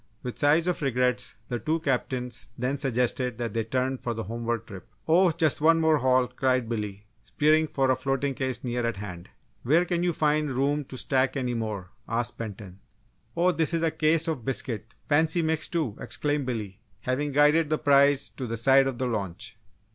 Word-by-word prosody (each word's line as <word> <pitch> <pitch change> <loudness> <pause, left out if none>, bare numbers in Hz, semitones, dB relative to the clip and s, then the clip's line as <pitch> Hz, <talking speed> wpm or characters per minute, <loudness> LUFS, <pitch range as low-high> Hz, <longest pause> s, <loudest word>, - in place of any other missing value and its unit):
With 125 - -5
sighs 155 +3 +4
of 180 -2 -1
regrets, 125 -2 0
the 120 - -3
two 160 +4 -1
captains 125 -6 -2
then 130 +3 -2
suggested 125 -2 0
that 115 -3 -3
they 115 - 0
turn 130 +3 -1
for 120 -1 -3
the 115 - -4
homeward 115 +2 -3
trip, 100 0 -11 0.2
"Oh, 175 +3 +5
just 160 -3 +1
one 165 +1 +5
more 160 -1 +4
haul!" 130 -1 +3
cried 130 -2 0
Billy, 105 -3 -4 0.2
spearing 155 +9 +2
for 135 -3 +1
a - - +3
floating 135 +1 -1
case 130 -2 -3
near 120 -1 -2
at 115 -3 -1
hand. 90 -4 -8 0.3
"Where 160 +8 +3
can 175 -1 -1
you 175 0 +2
find 150 -2 +1
room 140 +3 0
to 130 - -9
stack 130 +2 +1
any 125 -2 -1
more?" 105 -5 -4 0.2
asked 115 +1 -2
Benton. 100 -4 -7 0.6
"Oh, 180 +2 +4
this 165 -1 0
is 165 - 0
a 165 - +2
case 160 +1 +2
of 155 -7 -2
biscuits 115 -4 -3 0.2
fancy 160 +3 +3
mixed, 160 0 -1
too!" 155 -11 -1
exclaimed 145 -2 -1
Billy, 105 -5 -4 0.2
having 135 +4 -1
guided 150 +2 +4
the 155 - +1
prize 140 -1 +4
to 130 - -6
the 115 0 -3
side 135 +3 +5
of 130 -3 -3
the 130 - -1
launch. 100 -3 -4
130 Hz, 195 wpm, -26 LUFS, 115-150 Hz, 0.6 s, Oh